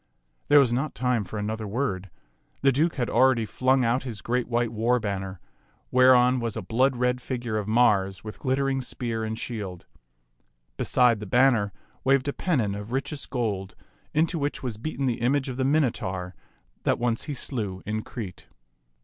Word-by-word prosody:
There 145 - +7
was 125 -4 +3
not 135 +5 -1
time 125 -2 +1
for 100 +3 -7
another 110 +1 -3
word; 100 -4 -2 0.5
the 135 - +6
Duke 155 +6 +1
had 120 -3 -1
already 125 -1 +3
flung 130 +4 +2
out 120 +3 +2
his 115 -7 -7
great 125 +1 0
white 120 -1 0
war 115 +3 +1
banner, 95 -3 -4 0.5
whereon 125 0 +5
was 115 -2 -3
a 110 - -4
blood 130 +7 +2
red 125 +1 0
figure 120 -5 -3
of 105 - -5
Mars 100 -4 +2
with 110 -1 -8
glittering 135 0 0
spear 115 -3 -3
and 110 0 -3
shield. 105 -7 -6 0.9
Beside 120 -4 +3
the 105 - -7
banner 120 -3 +3 0.3
waved 135 0 +3
a 140 - 0
pennon 125 - 0
of 105 +3 -7
richest 140 +3 -3
gold, 100 -7 -2 0.4
into 165 +2 +1
which 145 0 -2
was 120 -5 -3
beaten 140 +3 -3
the 120 -3 -1
image 135 +3 +1
of 125 - -5
the 130 - 0
Minotaur 100 -11 0 0.5
that - - +1
once 120 -1 0
he 145 - -4
slew 105 -8 -2
in 110 +1 -2
Crete. 105 -6 -8
120 Hz, 175 wpm, -26 LUFS, 105-130 Hz, 0.9 s, There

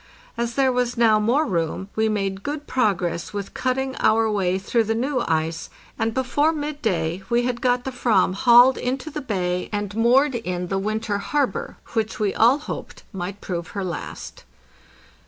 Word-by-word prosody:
As 235 -1 -2
there 270 -1 +3
was 245 -1 -1
now 225 -2 +5
more 245 +9 +2
room, 175 - -2
we 220 0 +2
made 195 -2 -2
cood 295 +5 -4
progress 185 - -1
with 200 -1 -5
cutting 260 +1 -1
our 220 0 +3
way 190 -3 +1
through 225 +4 0
the 225 +1 0
new 255 +1 0
ice, 160 0 -1 0.3
and 225 0 +1
before 260 +5 +1
midday 220 - -2
we 240 0 +2
had 245 -1 -2
got 245 -1 +2
the 265 - -4
"vam 220 -7 +2
hauled 245 +5 +6
into 265 +5 -3
the 300 0 -4
bay 180 -7 -2
and 205 -1 -3
moored 255 +5 +4
in 180 -6 -3
the 195 - 0
winter 215 0 -2
harbor 295 - -1 0.2
which 225 -1 -1
we 210 -2 +1
all 240 +5 +5
hoped 300 - -7
might 190 +1 -5
prove 170 -2 -4
her 200 - -1
last. 180 -2 -6
225 Hz, 175 wpm, -23 LUFS, 195-255 Hz, 0.3 s, hauled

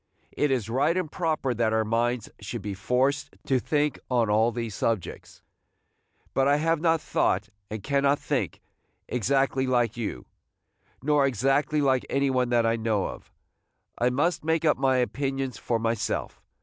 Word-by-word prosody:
It 150 - 0
is 125 -6 0
right 140 +9 +1
and 175 -5 -2
proper 155 -7 -1
that 115 -1 +1
our 110 0 +2
minds 115 +1 0
should 105 +1 -6
be 100 0 -3
forced 130 +8 0
to 130 -2 +2
think 150 +3 0
on 120 -4 +2
all 110 +3 +3
these 115 -2 -4
subjects; 110 -1 -3 0.9
but 135 0 +2
I 140 - +5
have 160 +1 +1
not 165 -1 +3
thought, - - 0 0.2
and 110 -2 -6
cannot 140 +1 +2
think, - - -2 0.5
exactly 130 +2 +1
like 120 -3 +1
you, 105 - -4 0.8
nor 145 -1 +3
exactly 135 +5 +1
like 130 -2 +2
any 140 0 +1
one 125 -1 +1
that 120 -1 +3
I 115 0 +2
know 110 -3 0
of. - - -11 0.6
I 120 - +2
must 150 +8 0
make 160 +1 +1
up 150 - +4
my 130 -1 +2
opinions 135 0 -2
for 115 - 0
myself. 115 -1 -2
130 Hz, 160 wpm, -26 LUFS, 115-145 Hz, 0.9 s, I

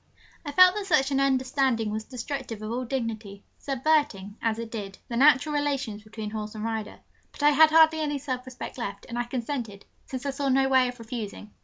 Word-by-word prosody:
I 290 - -5
felt 365 +4 +7
that 410 -1 -4
such 285 -6 +3
an 270 - +2
understanding 260 -4 +1
was 215 +1 -4
destructive 250 -3 -6
of 215 - -4
all 250 +2 -2
dignity, 225 -5 -4 0.2
subverting, 265 -8 0
as 225 -1 0
it 230 -1 -6
did, 200 -4 -6
the 235 - -3
natural 285 +3 +5
relations 275 -7 -1
between 215 0 -7
horse 215 0 -5
and 215 - -5
rider; 220 -1 -4 0.3
but - - -8
I 295 - +7
had 315 +2 +7
hardly 320 0 +5
any 295 -2 -1
self 260 -2 -4
respect 255 0 -8
left, 200 -4 -5
and 240 -1 -4
I 240 - -1
consented, 240 -4 -4 0.2
since 260 +1 -6
I 280 - 0
saw 275 0 -2
no 270 +1 +3
way 260 -1 +4
of 245 0 -6
refusing. 225 -3 -7
255 Hz, 205 wpm, -26 LUFS, 220-280 Hz, 0.3 s, felt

